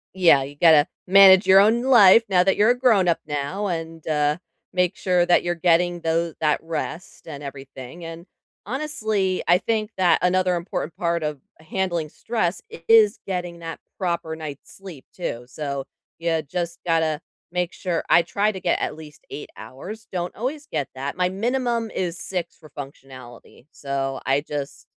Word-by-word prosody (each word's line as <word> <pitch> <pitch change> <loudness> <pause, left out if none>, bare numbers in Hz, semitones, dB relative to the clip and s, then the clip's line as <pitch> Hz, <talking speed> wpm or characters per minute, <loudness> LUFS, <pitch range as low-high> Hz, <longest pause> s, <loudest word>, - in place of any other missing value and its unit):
Yeah, 170 -7 +5
you 140 +2 -9
gotta 155 -1 +5 0.2
manage 190 0 +8
your 190 +1 +8
own 225 +4 +4
life 230 -5 +7
now 180 -2 +4
that 195 - +2
you're 215 +3 +5
a 245 - 0
grown 225 -8 +3
up 170 - +2
now 150 +8 -3
and, 165 -2 -5
uh, 150 -1 +1 0.4
make 180 -1 +1
sure 180 -2 +1
that 175 - +3
you're 175 0 -1
getting 175 0 +2
though 165 0 0
that 150 -1 +2
rest 165 +2 -6
and 145 -2 -8
everything, 135 +2 -9
and, 165 +1 -9 0.4
honestly, 215 -7 -1
I 175 - +6
think 215 +2 -1
that 175 -3 +4
another 180 0 +2
important 170 -2 -4
part 170 -2 -1
of 150 -2 -3 0.2
handling 170 -1 -2
stress 195 -1 -2 0.3
is 220 -2 +6
getting 175 -2 -4
that 165 -1 -7 0.2
proper 170 -4 -2
night's 150 -3 -9
sleep 180 -9 -11
too, 120 -9 -5
so 140 +1 -5 0.3
you 165 -1 0
just 170 +3 -4
gotta 160 -2 +1 0.3
make 180 -1 -2
sure 175 -3 -2
I - - +6
try 200 +5 0
to 190 - -7
get 180 -2 0
at - - -3
least 155 -2 -13
8 145 - -7
hours, 180 - -9
don't 175 -1 -4
always 285 +6 -4
get 145 - -3
that, 140 +4 -5
my 180 0 +1
minimum 235 +3 -1
is 175 -2 -3
6 180 -3 -4
for 155 - -16
functionality, 135 -3 -12
so 135 -1 -3
I 135 +2 +2
just 145 -2 -6
170 Hz, 170 wpm, -23 LUFS, 150-190 Hz, 0.4 s, manage